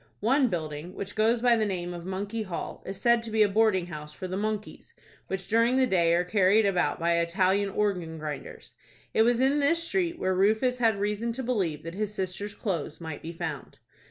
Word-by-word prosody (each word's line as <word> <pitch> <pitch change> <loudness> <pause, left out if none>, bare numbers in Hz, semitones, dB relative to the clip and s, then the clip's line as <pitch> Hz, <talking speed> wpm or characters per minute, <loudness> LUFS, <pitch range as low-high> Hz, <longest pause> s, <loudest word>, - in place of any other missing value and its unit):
One 260 +5 +3
building, 160 -2 -4
which 200 0 -5
goes 225 +2 +2
by 240 -1 +5
the 220 - +1
name 180 -4 -3
of 175 0 -8
Monkey 200 +4 -3
Hall, 185 -5 -5
is 195 0 -5
said 235 -1 +4
to 230 - -6
be 220 0 +4
a - - +4
boarding 200 -3 +2
house 150 -3 -8
for 185 - -6
the 185 - -4
monkeys, 215 +1 -4 0.3
which 190 -1 -4
during 230 +3 +3
the 260 0 +4
day 170 -6 +3
are 175 - +2
carried 200 +3 +3
about 180 -3 +1
by 170 0 +2
Italian 190 +4 +1
organ 185 -5 -1
grinders. 150 -1 -7 0.4
It - - +3
was 235 +1 +3
in 270 +3 +3
this 330 +4 +2
street 345 -1 0
where 185 0 0
Rufus 220 +7 +2
had 225 -4 +2
reason 210 +3 -1
to 260 +3 -4
believe 185 - -1
that 165 +1 -6
his 210 +2 -2
sister's 195 +2 -4
clothes 165 -7 -3
might 160 -3 -6
be 165 - -6
found. 160 -4 -6
200 Hz, 210 wpm, -27 LUFS, 175-225 Hz, 0.4 s, by